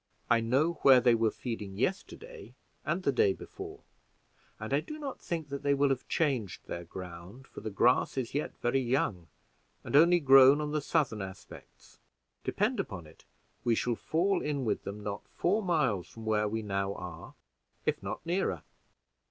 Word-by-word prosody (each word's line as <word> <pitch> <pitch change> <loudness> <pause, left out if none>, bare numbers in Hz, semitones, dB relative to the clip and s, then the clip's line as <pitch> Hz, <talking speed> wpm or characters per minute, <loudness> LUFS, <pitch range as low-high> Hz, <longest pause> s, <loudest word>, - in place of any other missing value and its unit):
"I 115 - +6
know 140 +9 +1
where 135 -2 +8
they 120 -1 +4
were 115 -1 +3
feeding 105 -5 -6
yesterday 420 - -4 0.3
and - - -1
the - - +3
day 430 -3 +3
before, 395 +2 -9 0.8
and - - -4
I - - +4
do 305 - -7
not 285 -3 -6
think 160 -4 -4
that 140 0 -4
they 140 -1 +2
will 140 0 +3
have 135 -2 -2
changed 130 - -1
their 85 - -5
ground, 90 +7 -9
for - - -11
the 110 - -4
grass 120 +6 +2
is 125 -3 -2
yet 145 +2 -3
very 120 +3 +1
young 120 - -1 0.6
and - - -3
only 170 +4 +7
grown 135 -1 +7
on 150 -1 -2
the 150 0 0
southern 135 -9 0
aspects. 95 -1 -11 0.4
Depend 215 +3 0
upon 100 - -4
it 75 - -18 0.4
we 120 -1 +2
shall 120 +2 0
fall 175 - 0
in 145 -3 -2
with 110 - -1
them 105 +1 -6
not 100 0 -5
four 200 +6 0
miles 130 - +1
from 115 -1 -11
where 105 -1 +1
we 110 +1 -3
now 100 -1 -2
are, 90 -3 -9 0.5
if - - 0
not - - -6
nearer." 170 - -1
130 Hz, 175 wpm, -30 LUFS, 105-160 Hz, 0.8 s, where